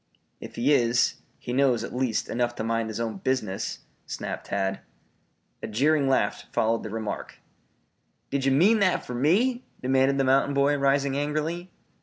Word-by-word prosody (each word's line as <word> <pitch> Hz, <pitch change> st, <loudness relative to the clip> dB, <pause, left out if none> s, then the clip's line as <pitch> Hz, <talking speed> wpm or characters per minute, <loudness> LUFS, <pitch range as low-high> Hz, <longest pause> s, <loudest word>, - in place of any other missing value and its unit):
"If -, -, -10 dB
he 130 Hz, +5 st, +2 dB
is, 120 Hz, -2 st, +2 dB, 0.2 s
he 120 Hz, -, -6 dB
knows, 130 Hz, -4 st, +2 dB
at 120 Hz, -, -6 dB
least, 125 Hz, -3 st, 0 dB
enough 120 Hz, 0 st, -1 dB
to -, -, -4 dB
mind 115 Hz, 0 st, -1 dB
his 110 Hz, -, -5 dB
own 115 Hz, -3 st, -3 dB
business," 105 Hz, -4 st, -2 dB, 0.3 s
snapped -, -, -5 dB
Tad. 95 Hz, -1 st, -1 dB, 0.8 s
A -, -, -4 dB
jeering 140 Hz, +5 st, +2 dB
laugh 135 Hz, -, 0 dB
followed 115 Hz, +1 st, +1 dB
the -, -, -6 dB
remark. 110 Hz, 0 st, -5 dB, 0.9 s
"Did 140 Hz, -1 st, -1 dB
ye 135 Hz, -, +3 dB
mean 195 Hz, +11 st, +4 dB
that 185 Hz, -3 st, +2 dB
fer 125 Hz, -, -6 dB
me?" 215 Hz, -, +2 dB, 0.2 s
demanded 135 Hz, +1 st, +2 dB
the 135 Hz, -, +2 dB
mountain 135 Hz, +2 st, +2 dB
boy, 140 Hz, +1 st, +3 dB
rising 140 Hz, 0 st, +1 dB
angrily. 155 Hz, +5 st, -2 dB
135 Hz, 165 wpm, -26 LUFS, 115-145 Hz, 0.9 s, mean